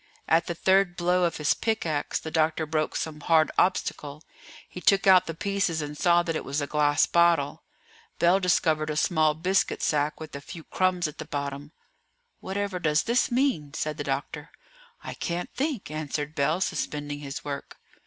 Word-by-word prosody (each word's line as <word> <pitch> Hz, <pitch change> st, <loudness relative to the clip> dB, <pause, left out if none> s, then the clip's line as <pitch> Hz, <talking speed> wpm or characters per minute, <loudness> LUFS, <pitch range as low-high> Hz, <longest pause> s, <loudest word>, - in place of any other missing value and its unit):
At 165 Hz, +1 st, +3 dB
the 170 Hz, -, -3 dB
third 190 Hz, 0 st, +2 dB
blow 180 Hz, +1 st, +2 dB
of 170 Hz, -, -1 dB
his 150 Hz, -1 st, +2 dB
pickaxe 165 Hz, -10 st, -1 dB
the 160 Hz, -, -6 dB
doctor 160 Hz, 0 st, +1 dB
broke 155 Hz, 0 st, -1 dB
some 155 Hz, -1 st, -3 dB
hard 160 Hz, 0 st, +3 dB
obstacle; 150 Hz, -5 st, -1 dB, 0.4 s
he 180 Hz, -, -9 dB
took 195 Hz, +1 st, +3 dB
out 185 Hz, -2 st, +6 dB
the 165 Hz, -, -4 dB
pieces 195 Hz, -3 st, -1 dB
and 150 Hz, -1 st, -5 dB
saw 175 Hz, +2 st, +3 dB
that 165 Hz, -1 st, -2 dB
it -, -, -3 dB
was 140 Hz, +2 st, -2 dB
a 145 Hz, -, -1 dB
glass 145 Hz, 0 st, +2 dB
bottle; 170 Hz, -1 st, +2 dB, 0.6 s
Bell 175 Hz, +3 st, +4 dB
discovered 160 Hz, -4 st, +1 dB
a 150 Hz, -, -2 dB
small 155 Hz, -2 st, +2 dB
biscuit 185 Hz, +5 st, 0 dB
sack 150 Hz, 0 st, 0 dB
with 155 Hz, -3 st, -9 dB
a 140 Hz, -, -6 dB
few 165 Hz, +3 st, -10 dB
crumbs 180 Hz, -1 st, 0 dB
at 150 Hz, -, -10 dB
the 155 Hz, -, -5 dB
bottom. 140 Hz, -1 st, -5 dB, 0.7 s
"Whatever 195 Hz, -1 st, -3 dB
does 150 Hz, -2 st, +2 dB
this 235 Hz, +2 st, +1 dB
mean?" 240 Hz, -, 0 dB
said 155 Hz, -1 st, -3 dB
the -, -, -3 dB
doctor. 145 Hz, +3 st, -4 dB, 0.5 s
"I -, -, -6 dB
can't 175 Hz, +1 st, -4 dB
think," 270 Hz, -, -3 dB
answered 150 Hz, -1 st, -4 dB
Bell, 155 Hz, +4 st, 0 dB
suspending 145 Hz, -4 st, -3 dB
his 140 Hz, 0 st, -7 dB
work. 140 Hz, -1 st, -6 dB
160 Hz, 180 wpm, -26 LUFS, 150-180 Hz, 0.7 s, out